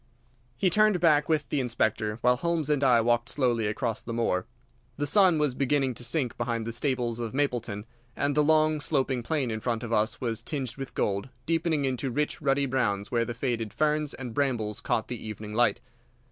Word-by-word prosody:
He 185 +4 +2
turned 210 -1 +4
back 150 -3 +3
with 155 -2 +1
the 145 - 0
Inspector, 110 -3 0
while 125 0 +4
Holmes 160 0 0
and 145 -1 +1
I 125 -3 +5
walked 120 0 +1
slowly 120 -6 +1
across 110 +1 -2
the 115 - -5
moor. 95 -6 0 0.5
The 145 - -1
sun 185 +1 +5
was 150 -4 +1
beginning 135 0 +1
to 120 - -7
sink 125 0 -1
behind 115 -1 -1
the 115 - -3
stables 120 -2 -1
of 115 +1 -4
Mapleton, 120 -7 -1 0.3
and 145 0 0
the 150 +1 +3
long, 155 0 +3
sloping 135 -4 0
plain 135 -1 -1
in 110 - -3
front 115 0 -2
of 115 -1 -3
us 110 +3 +1
was 115 -3 -2
tinged 130 -1 -4
with 135 -1 -7
gold, 100 +4 -1 0.2
deepening 165 -3 +1
into 130 0 -1
rich, 150 +6 -1
ruddy 140 -1 +2
browns 105 -7 -1
where 115 -1 +1
the 120 - -5
faded 115 -3 -2
ferns 150 -1 +1
and 125 -3 -7
brambles 120 -7 -1
caught 110 - -1
the 125 -2 -5
evening 105 -1 -6
light. 120 +2 +2
125 Hz, 200 wpm, -27 LUFS, 115-145 Hz, 0.5 s, I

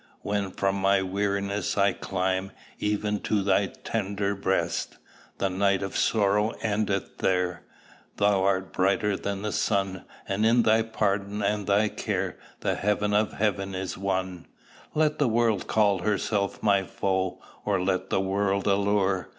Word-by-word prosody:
When 100 -1 -1
from 95 +1 -1
my 95 0 +3
weariness 100 +1 -1
I 100 -1 +4
climb 95 +1 -2 0.3
Even 105 0 0
to 105 -1 0
thy 100 0 +3
tender 100 -2 -2
breast! 95 -1 -1 0.4
The 100 - +1
night 100 +1 +1
of 100 - -5
sorrow 105 0 +2
endeth 100 -2 -1
there: 90 -2 0 0.6
Thou 100 -2 +3
art 95 -1 0
brighter 100 +2 +2
than 100 0 -4
the 105 - -1
sun; 95 -3 -1 0.2
And 100 +2 0
in 115 +2 +4
thy 110 +1 +4
pardon 105 -2 -1
and 105 0 0
thy 105 +2 +3
care - - -3 0.2
The - - +1
heaven 105 0 0
of 105 +1 +2
heaven 100 -2 -1
is 95 0 -3
won. 95 -2 -3 0.5
Let 155 -1 +2
the 145 - +3
world 115 -4 +1
call 105 -3 +3
herself 100 -1 -1
my 100 -2 +4
foe, 95 0 -2 0.2
Or 100 -2 +1
let 95 0 -1
the 95 - +1
world 100 +1 0
allure. 100 -2 +1
100 Hz, 150 wpm, -27 LUFS, 95-105 Hz, 0.6 s, I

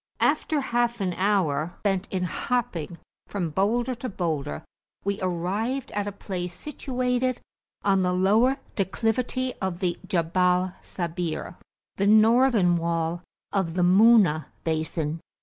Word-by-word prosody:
After 305 -2 +1
half 240 -2 0
an 185 -3 -1
hour 175 -5 +1
spent 195 -2 0
in 185 -1 -2
hopping 175 -3 -2 0.3
from 180 -6 -3
boulder 235 - +1
to 250 +1 -5
boulder, 155 - -3 0.4
we 200 0 -1
arrived 195 +9 -2
at 205 0 -2
a - - -2
place 180 -3 -5
situated 255 -3 -1 0.4
on 195 -1 +3
the 180 0 +1
lower 215 +9 +3 0.2
declivity 235 +6 -1
of 190 -3 -2
the 180 -2 -1
Jabal 180 0 +1
Sabir, 170 -1 -4 0.4
the 200 - +2
northern 220 -4 +5
wall 165 0 -1 0.3
of 175 -4 -1
the 180 - +2
Muna 190 -4 +5 0.2
basin. 160 0 -2
190 Hz, 125 wpm, -26 LUFS, 175-230 Hz, 0.4 s, northern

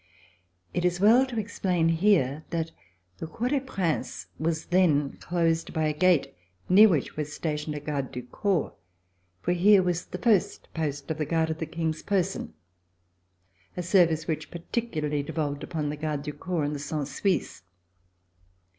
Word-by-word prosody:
It 175 - -1
is 175 0 +1
well 235 +7 +6
to 245 -3 -6
explain 185 -5 0
here 165 -5 +2
that 165 -1 -2 0.5
the 160 - -4
Cour 235 +9 -2
des 285 0 +2
Princes 195 - -2
was 160 0 -1
then 160 -6 +3
closed 165 -2 0
by 160 -2 0
a 155 - +1
gate 180 -1 +3 0.3
near 210 +4 +8
which 155 -8 0
was 150 -1 -3
stationed 150 0 -3
a - - -3
garde 145 -3 -3
du 125 - -6
corps, 175 - -1 0.7
for - - +1
here 190 +2 +5
was 175 -1 -1
the - - -6
first 215 -3 +1
post 145 -3 -3
of 160 - -3
the 155 - 0
guard 160 0 +1
of 160 - -5
the 160 - -3
King's 160 -1 -2
person, 195 - -1 1.2
a 180 - -2
service 170 -3 +3
which 160 -2 -3
particularly 165 -5 -2
devolved 145 0 -3
upon 155 -3 -3
the 150 - -4
Gardes 150 -1 -3
du 150 - -4
Corps 170 -1 -2
and 145 +1 -1
the 145 - -4
Cent 145 0 -3
Suisses. 165 - -1
165 Hz, 165 wpm, -27 LUFS, 150-185 Hz, 1.2 s, near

